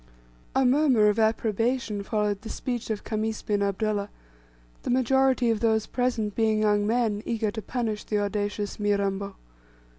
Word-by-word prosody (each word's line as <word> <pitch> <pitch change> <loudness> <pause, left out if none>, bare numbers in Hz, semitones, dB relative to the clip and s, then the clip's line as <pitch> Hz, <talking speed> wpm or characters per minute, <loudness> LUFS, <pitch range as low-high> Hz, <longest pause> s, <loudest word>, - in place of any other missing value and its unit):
A 265 0 +3
murmur 255 -5 +4
of 210 +2 0
approbation 225 0 0
followed 210 -1 -1
the 225 - -8
speech 240 -3 -4
of 215 -2 -3
Khamis 220 0 -2
bin 205 -1 0
Abdullah, 200 +1 -1 0.7
the - - -5
majority 260 -1 +3
of 220 - 0
those 220 -1 +2
present 240 -5 -1
being 220 -1 +1
young 205 -1 +2
men 225 -3 +1
eager 225 -2 -1
to 220 - -5
punish 220 -3 -3
the 210 - -1
audacious 205 0 -2
Mirambo. 200 -1 -1
215 Hz, 150 wpm, -26 LUFS, 205-235 Hz, 0.7 s, murmur